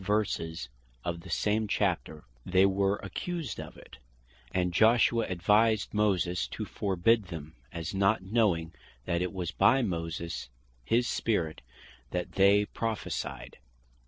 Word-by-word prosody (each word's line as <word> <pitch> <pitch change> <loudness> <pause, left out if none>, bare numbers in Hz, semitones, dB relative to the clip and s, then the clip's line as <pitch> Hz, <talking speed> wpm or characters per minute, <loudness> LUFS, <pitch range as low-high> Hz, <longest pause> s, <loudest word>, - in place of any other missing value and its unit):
verses 95 - -1 0.4
of 85 -1 -2
the 95 - -12
same 105 +1 +1
Chapter, 90 -7 -1 0.2
they 95 +4 +4
were 100 +1 +2
accused 165 - -4
of - - -8
it, - - -14 0.5
and 90 -1 0
Joshua 115 +2 +4
advised 105 +4 +2
Moses 90 - +1
to - - -5
forbid 100 +3 +1
them, 80 -4 -8 0.2
as 85 +1 -5
not 100 +1 +2
knowing 95 -6 +1 0.3
that 85 0 0
it 90 - -1
was 90 -4 -3
by 135 0 +4
Moses 85 - -4 0.3
his 120 - +2
Spirit 85 -9 -1 0.5
that 90 +5 -3
they 100 +1 +5
Prophecyed. 115 0 -4
95 Hz, 130 wpm, -29 LUFS, 85-110 Hz, 0.5 s, they